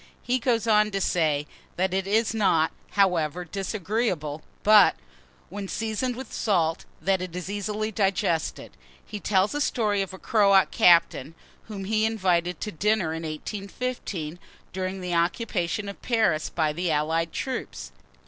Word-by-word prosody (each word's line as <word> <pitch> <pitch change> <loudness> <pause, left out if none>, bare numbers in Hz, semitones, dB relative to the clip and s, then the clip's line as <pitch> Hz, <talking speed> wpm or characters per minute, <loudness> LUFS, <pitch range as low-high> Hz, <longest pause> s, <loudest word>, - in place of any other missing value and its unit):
He 250 +1 +1
goes 230 -2 +1
on 215 -1 +4
to 195 -2 -2
say, 155 -6 +1 0.3
that 185 +1 0
it 190 0 -1
is 220 +2 +2
not, 180 -7 +2 0.2
however, 180 -4 +1
disagreeable; 190 -4 -2 0.2
but, 210 -1 +7 0.5
when 200 +1 -6
seasoned 225 +4 -2
with 260 +2 -8
salt, 165 -6 0
that 190 -1 +1
it 180 -2 -6
is 180 +2 -5
easily 210 +1 -2
digested. 190 -5 -1 0.3
He 210 - -7
tells 195 +2 +1
a 290 - -1
story 210 -7 +1
of 195 - -4
a 190 - -9
Croat 200 -2 +4
captain, 165 -3 +4 0.3
whom 205 -3 -6
he 215 +2 +2
invited 180 -6 0
to 210 - -3
dinner 195 -1 0
in 160 - -4
1815, 180 0 -5 0.3
during 185 +1 -3
the 180 -1 -3
occupation 175 +2 -1
of 200 - -8
Paris 220 -10 +1
by 155 -3 0
the 175 +2 -2
allied 160 +2 0
troops. 65 - -5
195 Hz, 150 wpm, -26 LUFS, 170-215 Hz, 0.5 s, but